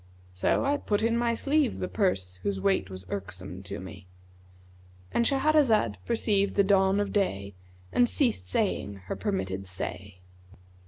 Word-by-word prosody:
So 90 Hz, -, +1 dB
I 285 Hz, +1 st, +2 dB
put 210 Hz, -6 st, -1 dB
in 230 Hz, 0 st, +2 dB
my 235 Hz, 0 st, +1 dB
sleeve[FN#152] 280 Hz, +3 st, +1 dB
the 185 Hz, -, -2 dB
purse 95 Hz, -, -1 dB
whose 95 Hz, +1 st, -2 dB
weight 95 Hz, 0 st, +1 dB
was 95 Hz, 0 st, -8 dB
irksome 95 Hz, -2 st, -6 dB
to 95 Hz, -, -6 dB
me."—And 90 Hz, -, -8 dB
Shahrazad 270 Hz, -, +3 dB
perceived 205 Hz, -3 st, +1 dB
the 200 Hz, -, +5 dB
dawn 195 Hz, 0 st, +3 dB
of 205 Hz, -1 st, -1 dB
day 100 Hz, -, 0 dB, 0.4 s
and 245 Hz, -1 st, +4 dB
ceased 250 Hz, -7 st, +1 dB
saying 145 Hz, -, -1 dB
her -, -, -3 dB
permitted 95 Hz, -, -3 dB
say. 90 Hz, +1 st, -6 dB
100 Hz, 145 wpm, -28 LUFS, -, 0.4 s, the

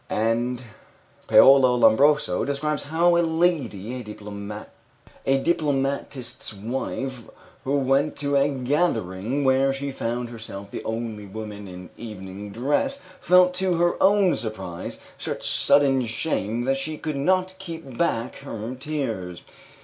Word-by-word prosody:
And 120 Hz, +3 st, 0 dB, 0.6 s
Paola 130 Hz, -2 st, +7 dB
Lombroso 145 Hz, +5 st, +4 dB
describes 145 Hz, +2 st, -1 dB
how 170 Hz, +4 st, +3 dB
a -, -, +4 dB
lady, 160 Hz, -, 0 dB
a 105 Hz, +5 st, -5 dB
diplomatist's 140 Hz, -7 st, -1 dB
wife, 130 Hz, +4 st, -4 dB, 0.4 s
who 140 Hz, +2 st, +1 dB
went 135 Hz, +2 st, +2 dB
to 145 Hz, -1 st, -1 dB
a 140 Hz, +1 st, +4 dB
gathering 130 Hz, -, 0 dB
where 135 Hz, 0 st, +3 dB
she 140 Hz, +1 st, -3 dB
found 120 Hz, -1 st, -3 dB
herself 100 Hz, -3 st, -8 dB
the -, -, -6 dB
only 110 Hz, -2 st, -4 dB
woman 105 Hz, 0 st, -7 dB
in 90 Hz, 0 st, -10 dB
evening 100 Hz, -2 st, -8 dB
dress, 145 Hz, -, 0 dB, 0.2 s
felt, 180 Hz, 0 st, +5 dB
to 185 Hz, -1 st, +1 dB
her 175 Hz, +1 st, +1 dB
own 195 Hz, -2 st, +5 dB
surprise, 95 Hz, -6 st, -5 dB, 0.2 s
such -, -, -4 dB
sudden 135 Hz, -2 st, +3 dB
shame 115 Hz, -1 st, -2 dB
that 135 Hz, +2 st, +1 dB
she 155 Hz, +3 st, -3 dB
could 155 Hz, -1 st, -4 dB
not 185 Hz, +6 st, +1 dB
keep 165 Hz, -8 st, -8 dB
back 120 Hz, -6 st, -1 dB
her 115 Hz, -3 st, -6 dB
tears. 125 Hz, -, -4 dB
130 Hz, 125 wpm, -24 LUFS, 110-150 Hz, 0.6 s, Paola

